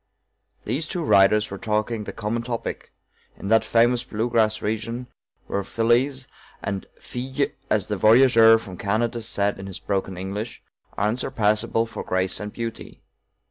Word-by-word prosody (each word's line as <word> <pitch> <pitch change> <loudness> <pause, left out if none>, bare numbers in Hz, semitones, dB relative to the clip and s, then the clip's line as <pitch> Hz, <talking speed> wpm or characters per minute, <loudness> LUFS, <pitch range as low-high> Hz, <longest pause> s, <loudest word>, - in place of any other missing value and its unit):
These 140 +8 -2
two 175 0 -2
riders 105 -3 +4
were 100 - -6
talking 110 0 -1
the - - -5
common 115 +2 -2
topic 120 -1 -5 0.5
in 100 - -6
that 115 0 +5
famous 120 +1 +3
Blue 115 +2 -3
Grass 110 -2 +2
region 110 +3 -3 0.4
where 100 - -2
fillies 120 +6 +1 0.4
and 100 -1 -3
fill 125 - -6 0.2
es, 140 - +3 0.2
as 105 -2 +2
the 105 - -3
voyageur 115 +1 +7
from 95 -5 -9
Canada 115 +4 -1
said 100 -2 -1
in 95 - -7
his 95 - -6
broken 95 -2 -2
English, 100 +5 -5 0.3
are 105 - +2
unsurpassable 115 -1 +1
for 115 - -7
grace 95 0 -1
and 105 +1 -5
beauty. 115 0 -7
110 Hz, 155 wpm, -24 LUFS, 100-120 Hz, 0.5 s, voyageur